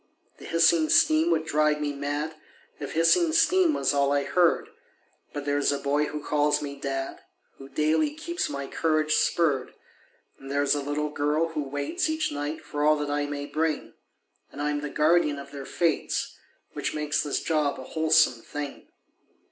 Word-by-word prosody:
The - - -11
hissing 165 -1 +3
steam 155 +2 +4
would 160 -2 +1
drive 150 -1 +2
me 145 -1 -2
mad 145 +2 -3 0.5
If 145 - -6
hissing 315 - +4
steam 335 -1 +4
was - - +1
all 140 0 +2
I 145 0 +2
heard; 180 - +2 0.6
But 145 -2 -6
there's 145 0 +1
a 140 - -1
boy 145 +2 0
who 150 0 -6
calls 150 0 +2
me 140 -1 -6
dad 135 -1 -4 0.4
Who 135 0 -11
daily 155 - +1
keeps 340 +4 -3
my 140 0 -4
courage 155 +1 0
spurred; 145 -8 +1 0.6
And 135 - -11
there's 140 0 +2
a 145 - -1
little 145 +1 -2
girl 150 +3 0
who 160 -2 -3
waits 145 - -2
Each 315 0 -1
night 145 +2 -4
for 145 0 -3
all 155 +1 +5
that 150 -1 -3
I 145 0 -1
may 145 0 -4
bring, 155 +2 -2 0.6
And - - -11
I'm 145 0 -1
the 150 - -4
guardian 150 -1 +2
of 140 0 -9
their 140 -2 -8
fates, 170 -2 -1 0.4
Which - - -3
makes 150 0 0
this 145 -2 -1
job 150 -3 0
a - - -7
wholesome 155 -5 +2
thing. 145 -1 -7
150 Hz, 175 wpm, -26 LUFS, 145-160 Hz, 0.6 s, all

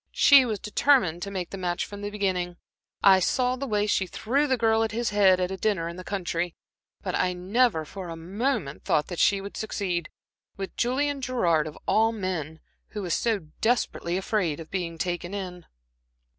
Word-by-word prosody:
"She 280 -2 +7
was 220 -3 -2
determined 210 - +2
to 200 - -4
make 185 -3 -4
the 195 - -6
match 175 -1 -1
from 205 0 -9
the 205 - -3
beginning. 185 -4 -1 0.5
I 190 -1 +7
saw 250 +7 +1
the 275 +2 -4
way 210 -3 +1
she 200 -2 +1
threw 270 +11 0
the 260 -2 +2
girl 225 -1 +3
at 225 - -1
his 235 -1 -1
head 195 -3 +5
at 180 0 -1
a 190 - -4
dinner 190 -5 0
in 170 - -6
the 185 - -8
country, 175 -3 -2 0.5
but - - -3
I 180 0 +1
never 185 -1 +1
for 185 +2 -8
a 165 - -5
moment 195 - -2
thought 155 +4 0
she 200 -1 +4
would 200 +1 -8
succeed 185 -6 -2 0.5
with 195 -1 -6
Julian 275 +3 0
Gerard 175 -12 +1
of 150 - -9
all 225 +1 +4
men, 180 -7 -4 0.3
who 205 -3 -5
is 175 - -1
so 205 -9 0
desperately 220 -6 0
afraid 190 -6 -1
of 160 - -10
being 175 -3 -3
taken 175 +2 -3
in." 180 -3 -6
195 Hz, 190 wpm, -26 LUFS, 175-220 Hz, 0.5 s, She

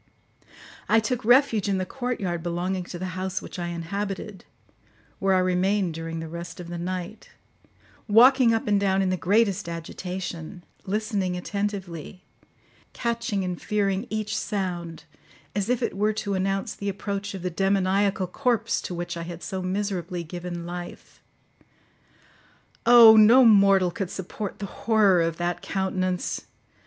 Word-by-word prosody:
I 225 - +5
took 245 +2 -2
refuge 235 -3 +4
in 195 - +1
the 185 - -1
courtyard 200 -8 -3
belonging 175 +2 -2
to 175 - -7
the 185 +1 -4
house 185 +1 -3
which - - -9
I 175 - -3
inhabited, 195 +3 -5 0.7
where 195 -1 +2
I - - +4
remained 185 0 +1
during 165 0 -5
the 165 - -5
rest 170 +1 -8
of 175 -1 -8
the 175 0 -5
night, 185 +3 -5 0.8
walking 245 +3 +6
up 225 0 0
and 205 -1 +3
down 195 -1 +2
in 185 - 0
the - - +1
greatest 195 0 +1
agitation, 175 +1 -6 0.2
listening 200 -3 -1
attentively, 190 -3 -5 0.7
catching 235 -4 -2
and 180 -2 -4
fearing 200 +1 0
each 215 0 -2
sound 180 -6 -3 0.5
as 205 +1 -1
if 250 -1 +1
it - - -2
were 210 +2 +1
to 210 -2 -3
announce 195 +1 -1
the 200 - -4
approach 200 +1 -4
of 185 - -7
the 180 - -2
demoniacal 195 +1 +1
corpse 230 +3 0
to 180 - -5
which 175 0 -4
I 170 - -5
had 170 0 -7
so 190 -2 -4
miserably 185 -2 -3
given 175 +1 -6
life. 175 0 -8 1.7
Oh! 235 -2 +10
No 230 +4 +7
mortal 195 -4 +5
could 185 +1 -4
support 190 +2 -6
the 200 - -5
horror 200 -3 +3
of 165 -1 -1
that 175 0 -2
countenance. 185 -2 -2
190 Hz, 150 wpm, -25 LUFS, 175-210 Hz, 1.7 s, Oh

